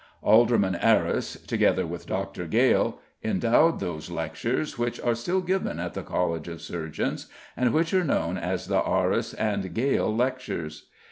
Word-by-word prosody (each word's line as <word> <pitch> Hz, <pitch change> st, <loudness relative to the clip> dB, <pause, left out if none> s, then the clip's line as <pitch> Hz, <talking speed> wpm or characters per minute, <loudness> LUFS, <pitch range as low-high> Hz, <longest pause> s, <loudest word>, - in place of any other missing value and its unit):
Alderman 110 Hz, -3 st, +4 dB
Arris, 85 Hz, -, +2 dB
together -, -, +2 dB
with -, -, -7 dB
Dr. 95 Hz, -2 st, -3 dB
Gale, -, -, +3 dB, 0.3 s
endowed 120 Hz, +9 st, +3 dB
those 80 Hz, -2 st, -5 dB
lectures, 85 Hz, -, -2 dB
which 120 Hz, -1 st, -2 dB
are 120 Hz, -, +1 dB
still 175 Hz, +12 st, -1 dB
given 185 Hz, +1 st, -1 dB
at -, -, -4 dB
the -, -, -4 dB
College 85 Hz, -3 st, -2 dB
of 85 Hz, -1 st, -7 dB
Surgeons, 80 Hz, -3 st, -4 dB, 0.3 s
and 125 Hz, -2 st, +2 dB
which 165 Hz, +2 st, +1 dB
are 185 Hz, -1 st, +4 dB
known 90 Hz, -, 0 dB
as 95 Hz, 0 st, -2 dB
the 95 Hz, 0 st, +1 dB
Arris 95 Hz, +5 st, 0 dB
and 100 Hz, -5 st, -2 dB
Gale 125 Hz, -2 st, +1 dB
Lectures. 120 Hz, -11 st, -2 dB
100 Hz, 150 wpm, -26 LUFS, 90-125 Hz, 0.3 s, Alderman